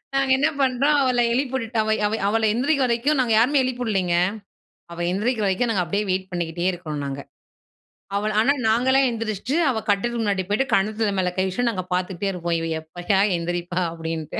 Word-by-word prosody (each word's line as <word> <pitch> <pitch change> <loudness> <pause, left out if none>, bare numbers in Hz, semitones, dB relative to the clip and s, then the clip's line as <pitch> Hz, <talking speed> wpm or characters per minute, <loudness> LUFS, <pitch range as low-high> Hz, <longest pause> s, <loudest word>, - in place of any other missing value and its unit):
நாங்க 270 -1 +1
என்ன 285 - +2
பண்றோம், 270 +3 +2
அவள 250 -2 +2
எழுப்பி 265 +1 -1
விட்டுட்டு, 230 -2 -2
அவ 220 0 +1
அவ 220 +1 -2
அவள 225 +2 +1
எந்திரிக்கிற 270 +2 +1
வரைக்கும் 255 +5 +1
நாங்க 230 -3 +1
யாருமே 275 +4 +3
எழுப்பி 250 -1 -3
வுடலைங்க. 190 -6 0 0.8
அவ 170 - -9
எந்திரிக்கிற 215 +2 0
வரைக்கும், 210 +5 +1
நாங்க 190 -5 +1
அப்டியே 200 +5 -1
வெயிட் 190 +1 -2
பண்ணிக்கிட்டே 175 0 -3
இருக்குறோம் 155 -5 -5
நாங்க. 140 0 -5 1.0
அவள 210 +1 0
ஆனா 275 +5 +3 0.2
நாங்கல்லாம் 260 +4 +3
எந்திரிச்சுட்டு, 225 +3 -3
அவ 235 - 0
கட்டுலுக்கு 235 +4 0
முன்னாடி 200 -3 0
போய்ட்டு, 250 +6 +1
கண்ணத்துல 210 0 +1
மேல 180 -1 0
கை 190 - +2
வச்சுட்டு, 235 +6 0
நாங்க 185 -4 -4
பாத்துக்கிட்டே 185 +2 -2
இருக்கோம். 170 -2 -2
இவ 165 - -3 0.2
எப்பயா 175 +5 -1 0.2
எந்திரிப்பா 175 +1 -3
அப்டின்டு. 165 -2 -5
215 Hz, 180 wpm, -23 LUFS, 180-245 Hz, 1.0 s, யாருமே